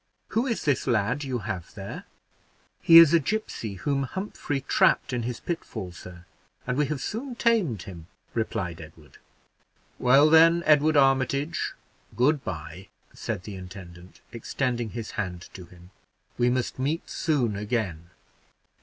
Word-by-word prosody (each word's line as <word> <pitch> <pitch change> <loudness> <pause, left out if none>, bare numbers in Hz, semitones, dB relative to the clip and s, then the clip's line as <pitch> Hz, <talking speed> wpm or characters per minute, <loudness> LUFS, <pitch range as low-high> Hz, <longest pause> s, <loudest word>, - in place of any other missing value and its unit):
Who 235 +4 0
is 230 - -2
this 140 -3 +1
lad 120 +4 +1
you 130 -3 -2
have 95 -4 -5
here?" 95 -2 -7 0.8
"He 165 - +8
is 165 -1 +9
a 170 - +6
gipsy 145 - -3
whom 140 +7 -1
Humphrey 145 -2 -4
trapped 135 - +2
in 120 - -1
his 120 0 -4
pitfall, 110 - -5
sir, 90 0 -12 0.4
and 125 - -1
we 150 +1 +1
have 150 -1 -3
soon 240 - -5
tamed 205 - +1
him," 85 -4 -10 0.3
replied 105 -7 -3
Edward. 75 -3 -15 0.8
"Well, 135 +4 +6
then, 165 +1 +6
Edward 150 0 +4
Armitage, 140 +3 +1 0.4
good 140 +3 +2
by," 80 +3 -7 0.3
said 90 - -5
the 105 - -8
intendant, 90 -1 -11
extending 120 0 -2
his 115 0 -6
hand 90 -2 -7
to 90 - -10
him, 90 +1 -17 0.4
"we 120 0 +2
must 125 0 -2
meet 150 +6 -2
soon 130 - 0
again." 100 -6 -3
125 Hz, 145 wpm, -26 LUFS, 95-150 Hz, 0.8 s, is